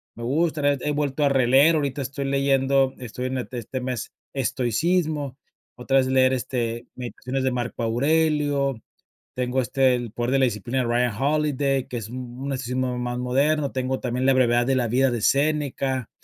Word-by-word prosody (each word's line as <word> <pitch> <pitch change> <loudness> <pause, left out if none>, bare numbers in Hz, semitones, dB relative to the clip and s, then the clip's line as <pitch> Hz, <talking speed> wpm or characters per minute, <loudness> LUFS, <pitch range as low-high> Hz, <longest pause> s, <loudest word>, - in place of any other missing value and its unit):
Me 120 - -8
gusta, 155 +5 0
re 145 0 +2
he 150 - -1
vuelto 145 0 -1
a - - +4
releer, 135 +4 +5
ahorita 140 -2 -1
estoy 135 +1 -4
leyendo, 135 -1 +2
estoy 125 0 -6
en 130 0 -3
ete 125 0 -6
este 130 +3 -5
mes 125 -3 -4 0.2
estoicismo, 140 - 0 0.4
otra 135 +2 +1
vez 130 -1 +3
leer, 130 0 +3
este, 120 -2 -3
Meditaciones 130 +1 -4
de 130 - +1
Marco 120 -1 -3
Aurelio, 140 +1 +1 0.5
tengo 125 +1 0
este 130 +1 +2
El 120 -3 -4
Poder 120 +2 -2
de 135 - +3
la 130 - +5
Disciplina 120 +2 -2
de 125 - +1
Ryan 120 -1 +1
Holiday, 140 -2 +1
que 125 - -5
es 110 -2 -6
un 125 0 -7
un 140 0 -2
estilo 125 -1 -3 0.2
más 125 0 -3
moderno, 140 +4 +1
tengo 130 0 -2
también 125 +1 -2
La 135 - +5
Brevedad 120 -2 +3
de 135 - +2
la 125 -2 +1
Vida 130 +4 +3
de 120 -2 -2
Séneca. 140 -3 0
130 Hz, 185 wpm, -24 LUFS, 125-140 Hz, 0.5 s, releer